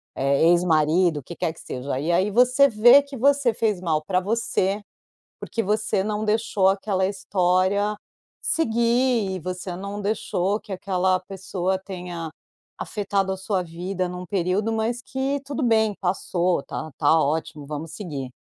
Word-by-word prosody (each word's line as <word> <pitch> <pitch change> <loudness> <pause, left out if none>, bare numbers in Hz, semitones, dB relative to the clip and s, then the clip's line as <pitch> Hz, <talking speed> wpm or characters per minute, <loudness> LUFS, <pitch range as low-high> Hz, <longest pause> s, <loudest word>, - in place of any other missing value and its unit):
eh, 140 +3 +2
ex-marido, 170 -1 +3
o 140 - -12
que 170 - -9
quer 160 - -2
que - - -16
seja, 130 +1 -4
e 160 +4 -1
aí 190 +4 +2
você 250 +5 +5
vê 240 +4 +7
que 280 0 -10
você 275 -1 +3
fez 210 -4 0
mal 155 -3 0
para 185 +3 +1
você, 205 -1 0 0.6
porque 230 - -3
você 210 -1 0
não 210 +1 -2
deixou 210 -2 +1
aquela 195 -1 0
história 190 +1 +1 0.5
seguir 235 -5 +1
e 185 - -3
você 180 +1 -5
não 200 +3 -6
deixou 200 -1 -1
que 210 - -13
aquela 185 -1 0
pessoa 190 0 -3
tenha 175 -4 -6 0.5
afetado 200 -2 -1
a 190 - -3
sua 190 -1 -1
vida 180 +2 -3
num 180 0 -6
período, 190 +4 0
mas 230 +2 -1
que 270 +2 -2
tudo 285 +1 -3
bem, 220 -3 +2
passou, 180 -3 0
tá 155 - -6
tá 160 - +4
ótimo, 155 0 -2
vamos 150 +2 -6
seguir. 145 -10 -5
190 Hz, 155 wpm, -24 LUFS, 175-215 Hz, 0.6 s, vê